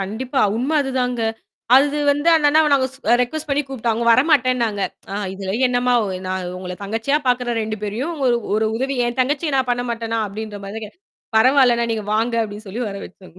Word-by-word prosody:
கண்டிப்பா. 240 Hz, +8 st, -2 dB, 0.2 s
உண்ம 260 Hz, +6 st, -1 dB
அதுதாங்க. 250 Hz, -3 st, -1 dB, 0.6 s
அது 290 Hz, +2 st, +3 dB
வந்து 290 Hz, +4 st, +1 dB
அந்த 300 Hz, -2 st, +2 dB
அண்ணாவ 310 Hz, 0 st, +4 dB
நாங்க 265 Hz, -2 st, +3 dB, 0.2 s
அ -, -, +6 dB
ரெக்கொஸ்ட் 305 Hz, +5 st, -2 dB
பண்ணி 280 Hz, +1 st, +1 dB
கூப்பிட்டோம். 235 Hz, -4 st, -1 dB
அவுங்க 235 Hz, +1 st, -2 dB
வரமாட்டேனாங்க. 255 Hz, -7 st, +2 dB, 0.3 s
ஆ -, -, -3 dB, 0.2 s
"இதுலாம் 195 Hz, +5 st, -3 dB
என்னம்மா! 245 Hz, 0 st, +1 dB
ஒ -, -, -3 dB, 0.2 s
நான் 185 Hz, -1 st, -3 dB
உங்கள 180 Hz, -1 st, -6 dB
தங்கச்சியா 225 Hz, +8 st, 0 dB
பாக்குறேன் 245 Hz, -2 st, 0 dB
2 215 Hz, 0 st, -4 dB
பேரையும் 245 Hz, +11 st, -3 dB
உங்க 275 Hz, -5 st, 0 dB, 0.3 s
ஒரு 220 Hz, 0 st, +1 dB
உதவி." 265 Hz, +2 st, -2 dB
என் 240 Hz, +2 st, -4 dB
தங்கச்சிய 290 Hz, +3 st, 0 dB
நான் 260 Hz, -1 st, 0 dB
பண்ண 245 Hz, 0 st, 0 dB
மாட்டன்னா! 230 Hz, -1 st, -2 dB
அப்பிடின்ற 210 Hz, 0 st, -7 dB
மாரிக்க 215 Hz, +1 st, -7 dB, 0.5 s
பரவால்லண்ணா! 245 Hz, -1 st, +4 dB
நீங்க 215 Hz, -2 st, -3 dB
வாங்க 230 Hz, +2 st, 0 dB
அப்பிடி 210 Hz, 0 st, -7 dB
சொல்லி 235 Hz, +6 st, -4 dB
வர 200 Hz, -, -6 dB
வச்சுக்கோங்க. 185 Hz, -1 st, -15 dB
240 Hz, 185 wpm, -20 LUFS, 215-270 Hz, 0.6 s, அ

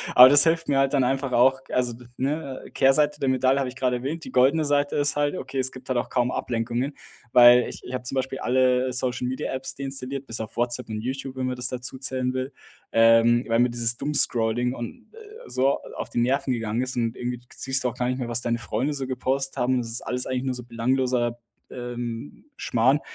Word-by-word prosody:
aber 125 Hz, -, +11 dB
das 140 Hz, +1 st, +7 dB
hilft 165 Hz, 0 st, +1 dB
mir 135 Hz, -1 st, +2 dB
halt 135 Hz, 0 st, +2 dB
dann 135 Hz, -2 st, +3 dB
einfach 135 Hz, 0 st, -1 dB
auch 130 Hz, +2 st, +4 dB
also, 125 Hz, -2 st, 0 dB, 0.2 s
ne 140 Hz, 0 st, -3 dB
Kehrseite 145 Hz, +2 st, +3 dB
der 135 Hz, -, +1 dB
Medaille 130 Hz, +1 st, +2 dB
habe 130 Hz, -2 st, -1 dB
ich 125 Hz, -, -11 dB
gerade 125 Hz, -2 st, 0 dB
erwähnt, 150 Hz, +6 st, -5 dB
die 130 Hz, -, -8 dB
goldene 140 Hz, +5 st, +3 dB
Seite 145 Hz, 0 st, +1 dB
ist 145 Hz, 0 st, +1 dB
halt 145 Hz, +4 st, 0 dB
okay, 130 Hz, +1 st, -5 dB
es 130 Hz, 0 st, 0 dB
gibt 130 Hz, 0 st, -12 dB
halt 130 Hz, -2 st, 0 dB
auch -, -, -4 dB
kaum 125 Hz, 0 st, +1 dB
Ablenkungen, 120 Hz, +4 st, -2 dB, 0.4 s
weil 120 Hz, 0 st, +8 dB
ich -, -, -9 dB
ich 125 Hz, -, -8 dB
habe 125 Hz, 0 st, -3 dB
zum 125 Hz, -, -4 dB
Beispiel 135 Hz, 0 st, -2 dB
alle 130 Hz, 0 st, +2 dB
Social 125 Hz, 0 st, -1 dB
Media 130 Hz, +1 st, -3 dB
Apps 130 Hz, 0 st, -5 dB
deinstalliert, 135 Hz, 0 st, -5 dB
bis 115 Hz, 0 st, -3 dB
auf 110 Hz, -, -8 dB
WhatsApp 120 Hz, +1 st, -1 dB
und 110 Hz, -1 st, -4 dB
YouTube, 130 Hz, +2 st, -5 dB
wenn 130 Hz, -, -1 dB
man 130 Hz, 0 st, -2 dB
das 125 Hz, 0 st, -1 dB
dazu 125 Hz, +1 st, -4 dB
zählen 130 Hz, -1 st, -2 dB
will, 130 Hz, +1 st, -3 dB, 0.4 s
ähm, 115 Hz, +1 st, +5 dB
weil 115 Hz, +1 st, +2 dB
mir 125 Hz, 0 st, +4 dB
dieses 120 Hz, 0 st, -1 dB
Doom 150 Hz, -, -3 dB
Scrolling 120 Hz, 0 st, +2 dB
und, 120 Hz, -, -9 dB
äh 450 Hz, +1 st, -13 dB
so, 135 Hz, +2 st, +2 dB
äh, -, -, -11 dB
auf -, -, -5 dB
die -, -, -2 dB
Nerven 135 Hz, +2 st, +1 dB
gegangen 115 Hz, -1 st, -1 dB
ist 130 Hz, -1 st, -2 dB
und 115 Hz, 0 st, -1 dB
irgendwie 125 Hz, 0 st, -4 dB, 0.2 s
siehst 135 Hz, 0 st, -1 dB
du 125 Hz, -, +1 dB
auch 125 Hz, -, -9 dB
gar 125 Hz, 0 st, -1 dB
nicht 130 Hz, -, -1 dB
mehr, 125 Hz, -, -3 dB
was 120 Hz, 0 st, +1 dB
deine 120 Hz, 0 st, 0 dB
Freunde 120 Hz, +6 st, -2 dB
so 135 Hz, -2 st, -4 dB
gepostet 135 Hz, +1 st, -2 dB
haben 125 Hz, +1 st, +1 dB
und 125 Hz, -, +1 dB
das 115 Hz, -, -7 dB
ist 115 Hz, -, -2 dB
alles 125 Hz, 0 st, -2 dB
eigentlich 130 Hz, 0 st, -2 dB
nur 130 Hz, -1 st, -2 dB
so 125 Hz, -, -7 dB
belangloser, 120 Hz, 0 st, 0 dB, 0.3 s
ähm, 120 Hz, -, -6 dB
Schmarrn, 130 Hz, +6 st, +2 dB
130 Hz, 235 wpm, -24 LUFS, 120-135 Hz, 0.4 s, aber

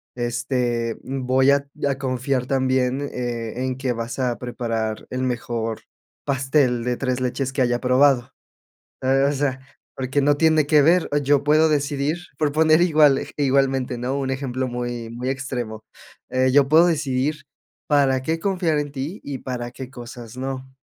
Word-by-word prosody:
este, 120 Hz, -1 st, -1 dB
voy 130 Hz, +1 st, +2 dB
a 140 Hz, 0 st, +1 dB, 0.2 s
a 135 Hz, -, -1 dB
confiar 130 Hz, -1 st, -1 dB
también, 130 Hz, 0 st, +1 dB
eh, 120 Hz, -2 st, -4 dB
en 130 Hz, 0 st, -2 dB
que 130 Hz, -2 st, -1 dB
vas 115 Hz, +1 st, -4 dB
a 125 Hz, -2 st, -1 dB
preparar 115 Hz, -3 st, -3 dB
el 130 Hz, 0 st, -3 dB
mejor 115 Hz, -3 st, -2 dB, 0.4 s
pastel 135 Hz, -3 st, +1 dB
de 125 Hz, 0 st, 0 dB
3 130 Hz, -1 st, -2 dB
leches 130 Hz, +1 st, -2 dB
que 135 Hz, -, -1 dB
haya 120 Hz, -1 st, +1 dB
probado. 130 Hz, -1 st, +3 dB, 0.7 s
Eh, 135 Hz, +1 st, +3 dB
o -, -, +2 dB
sea, 135 Hz, -1 st, -1 dB, 0.4 s
porque 135 Hz, +2 st, -1 dB
no 145 Hz, +1 st, +3 dB
tiene 155 Hz, -2 st, +4 dB
que 150 Hz, -1 st, +5 dB
ver, 170 Hz, +4 st, +3 dB
yo 140 Hz, 0 st, +3 dB
puedo 155 Hz, +2 st, +4 dB
decidir 145 Hz, +1 st, 0 dB, 0.2 s
proponer 155 Hz, +2 st, +3 dB
igual 150 Hz, -5 st, +5 dB
ej -, -, -5 dB
igualmente, 135 Hz, -2 st, +1 dB
¿no?, 130 Hz, +3 st, -2 dB
un 135 Hz, -1 st, -2 dB
ejemplo 130 Hz, -1 st, -2 dB
muy 120 Hz, -1 st, -4 dB
muy 125 Hz, +3 st, -4 dB
extremo. 125 Hz, -5 st, -4 dB, 0.5 s
Eh, 130 Hz, 0 st, +2 dB
yo 140 Hz, 0 st, +5 dB
puedo 165 Hz, +3 st, +6 dB
decidir 145 Hz, -1 st, -1 dB, 0.4 s
para 135 Hz, -3 st, +3 dB
qué 160 Hz, +4 st, -1 dB
confiar 175 Hz, -5 st, 0 dB
en 145 Hz, -1 st, -4 dB
ti 145 Hz, +9 st, -5 dB
y 135 Hz, -3 st, -5 dB
para 120 Hz, -2 st, -5 dB
qué 130 Hz, 0 st, -8 dB
cosas 120 Hz, -2 st, -10 dB
no. 130 Hz, 0 st, -5 dB
130 Hz, 160 wpm, -22 LUFS, 125-145 Hz, 0.7 s, puedo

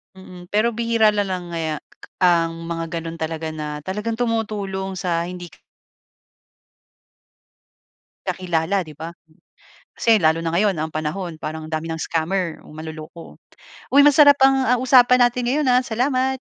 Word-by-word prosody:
Mm. 180 Hz, -1 st, -12 dB
Pero 215 Hz, +5 st, +1 dB
bihira 230 Hz, -1 st, +2 dB
na 205 Hz, -1 st, -1 dB
lang 180 Hz, -2 st, -5 dB
ngaya 160 Hz, -2 st, -2 dB, 0.5 s
ang 165 Hz, -1 st, +2 dB
mga 165 Hz, 0 st, -4 dB
gano'n 165 Hz, 0 st, -7 dB
talaga 160 Hz, 0 st, -3 dB
na 150 Hz, -1 st, -6 dB
talagang 210 Hz, +5 st, -3 dB
tumutulong 205 Hz, -5 st, -2 dB
sa 170 Hz, -2 st, -1 dB
hindi 180 Hz, -1 st, -8 dB, 2.8 s
kakilala, 180 Hz, +1 st, -1 dB
'di 155 Hz, -4 st, -11 dB
ba? 165 Hz, +2 st, -7 dB, 0.8 s
Kasi 225 Hz, -2 st, +3 dB
lalo 160 Hz, -1 st, +2 dB
na 165 Hz, -, -1 dB
ngayon 195 Hz, +3 st, +2 dB
ang 160 Hz, 0 st, -3 dB
panahon, 155 Hz, +2 st, -4 dB
parang 155 Hz, 0 st, -5 dB
ang 155 Hz, -, -11 dB
dami 155 Hz, +1 st, -3 dB
ng 160 Hz, 0 st, -4 dB
scammer 170 Hz, +1 st, -2 dB
o 150 Hz, -, -13 dB
manloloko. 160 Hz, +1 st, -10 dB, 0.5 s
Uy, 285 Hz, -, +8 dB
masarap 285 Hz, 0 st, +7 dB
ang, 270 Hz, 0 st, +5 dB
ah, 250 Hz, +1 st, +3 dB
usapan 250 Hz, -1 st, +5 dB
natin 245 Hz, 0 st, +2 dB
ngayon, 280 Hz, +4 st, 0 dB
ah. 250 Hz, 0 st, +3 dB
Salamat. 255 Hz, +3 st, 0 dB
180 Hz, 145 wpm, -21 LUFS, 165-230 Hz, 2.8 s, Uy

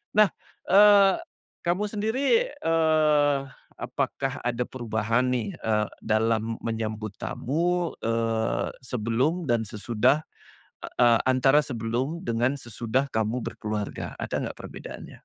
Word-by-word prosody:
Nah, 210 Hz, -4 st, +6 dB, 0.4 s
eee, 200 Hz, -1 st, +7 dB, 0.5 s
kamu 180 Hz, +4 st, +1 dB
sendiri, 220 Hz, +4 st, -1 dB, 0.4 s
eee, 155 Hz, -, +3 dB, 0.4 s
apakah -, -, -3 dB
ada 125 Hz, 0 st, 0 dB
perubahan 115 Hz, 0 st, -1 dB
nih, 125 Hz, -, -1 dB
eee, 105 Hz, -1 st, +1 dB
dalam 110 Hz, +1 st, 0 dB
menyambut 110 Hz, -2 st, -3 dB
tamu? 170 Hz, +5 st, -1 dB
Eee, 115 Hz, 0 st, 0 dB
sebelum 125 Hz, +8 st, -1 dB
dan 115 Hz, -1 st, +2 dB
sesudah, 115 Hz, +6 st, +1 dB, 0.8 s
eee, 120 Hz, -2 st, +6 dB
antara 135 Hz, +3 st, +5 dB
sebelum 130 Hz, -, -3 dB
dengan 120 Hz, +3 st, +1 dB
sesudah 120 Hz, +2 st, -2 dB
kamu 110 Hz, +2 st, -1 dB
berkeluarga, 105 Hz, -1 st, -4 dB
ada -, -, -3 dB
nggak -, -, -5 dB
perbedaannya? -, -, -9 dB
125 Hz, 105 wpm, -26 LUFS, 115-155 Hz, 0.8 s, eee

